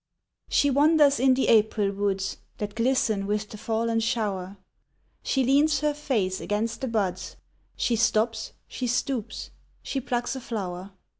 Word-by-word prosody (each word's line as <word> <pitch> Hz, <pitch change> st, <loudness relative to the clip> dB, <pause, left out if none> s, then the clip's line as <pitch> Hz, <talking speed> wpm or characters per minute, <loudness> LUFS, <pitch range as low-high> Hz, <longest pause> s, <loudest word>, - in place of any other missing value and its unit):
She 285 Hz, -, +3 dB
wanders 290 Hz, 0 st, +4 dB
in 260 Hz, 0 st, +4 dB
the 265 Hz, -, +1 dB
April 215 Hz, -2 st, +3 dB
woods, 195 Hz, -1 st, -1 dB, 0.2 s
That 210 Hz, -1 st, -4 dB
glisten 225 Hz, -4 st, +1 dB
with 210 Hz, 0 st, -1 dB
the 215 Hz, -, -9 dB
fallen 225 Hz, +1 st, 0 dB
shower; 205 Hz, -5 st, -2 dB, 0.6 s
She 270 Hz, -, +1 dB
leans 290 Hz, +3 st, +3 dB
her 300 Hz, -1 st, +1 dB
face 220 Hz, -11 st, -1 dB
against 220 Hz, +4 st, -2 dB
the 265 Hz, -, -1 dB
buds, 195 Hz, -6 st, -2 dB, 0.4 s
She 240 Hz, -, +1 dB
stops, 220 Hz, 0 st, +1 dB
she 250 Hz, -, -4 dB
stoops, 240 Hz, -2 st, -2 dB, 0.3 s
she 270 Hz, -, -3 dB
plucks 245 Hz, +1 st, -2 dB
a 265 Hz, -, -6 dB
flower. 190 Hz, -5 st, -5 dB
225 Hz, 145 wpm, -26 LUFS, 205-260 Hz, 0.6 s, wanders